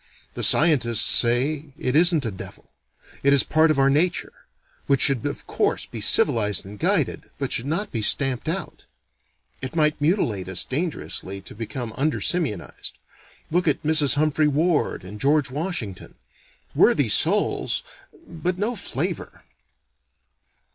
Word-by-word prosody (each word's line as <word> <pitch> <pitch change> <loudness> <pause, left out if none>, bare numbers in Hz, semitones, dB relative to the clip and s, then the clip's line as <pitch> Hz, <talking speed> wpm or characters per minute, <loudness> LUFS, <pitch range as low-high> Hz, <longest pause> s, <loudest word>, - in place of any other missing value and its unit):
The - - -6
scientists 130 -8 +4
say 140 +5 +2
it 125 +2 -3
isn't 165 -3 +5
a 115 - -3
devil, 95 - -11 0.5
it 140 0 +3
is 140 - +4
part 160 +1 +2
of 155 - +1
our 135 0 +3
nature, 170 +5 -1 0.5
which 140 -1 +2
should 135 -5 +4
of - - -7
course - - -2
be - - -9
civilized 105 -3 +3
and 100 +1 -11
guided, - - -1
but - - -4
should 120 - -1
not 195 +7 -3
be 115 - -4
stamped 135 +5 +2
out. 190 +3 -6 0.8
(It 130 +4 -6
might 150 -2 +1
mutilate 135 - -1
us 95 - -1
dangerously 135 - -5
to - - -13
become 115 +1 -7
under 150 +3 -1
simianized. 150 - -3 0.6
Look 175 +1 0
at 145 - 0
Mrs. 155 -2 +4
Humphry 155 +1 +1
Ward 155 - -1
and 105 +3 -10
George 140 -1 +1
Washington. 145 - -5 0.6
Worthy - - +3
souls, - - +2 0.4
but 175 +2 -4
no 220 +5 -2
flavor.) - - -5
145 Hz, 140 wpm, -22 LUFS, 120-160 Hz, 0.8 s, isn't